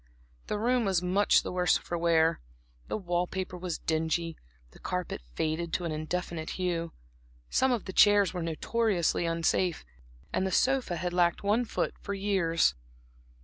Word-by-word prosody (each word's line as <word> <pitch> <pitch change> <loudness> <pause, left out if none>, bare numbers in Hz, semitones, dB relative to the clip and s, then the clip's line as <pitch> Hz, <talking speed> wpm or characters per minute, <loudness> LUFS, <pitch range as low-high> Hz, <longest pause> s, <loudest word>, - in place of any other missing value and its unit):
The 210 - -1
room 245 +3 +2
was 190 -4 +1
much 190 +3 +3
the - - -4
worse 180 0 +3
for 175 - -5
wear, 165 -1 +2 0.5
the - - -2
wall 175 -3 -1
paper 185 -1 -4
was 180 -2 -4
dingy, 160 +1 -1 0.4
the - - -17
carpet 180 - -3
faded 160 +2 -1
to 180 - -1
an 165 - -2
indefinite 160 +1 -3
hue, 170 -3 -1 0.6
some 260 +1 +3
of 240 -5 -1
the 190 - -6
chairs 205 -2 +5
were 180 - -3
notoriously 175 +1 0
unsafe, 165 +1 0 0.5
and - - +1
the - - -3
sofa 260 -4 +2
had 175 +1 -3
lacked 175 0 +2
one 215 +5 +2
foot - - -2
for 200 - -4
years. 190 - +2
180 Hz, 160 wpm, -29 LUFS, 165-200 Hz, 0.6 s, chairs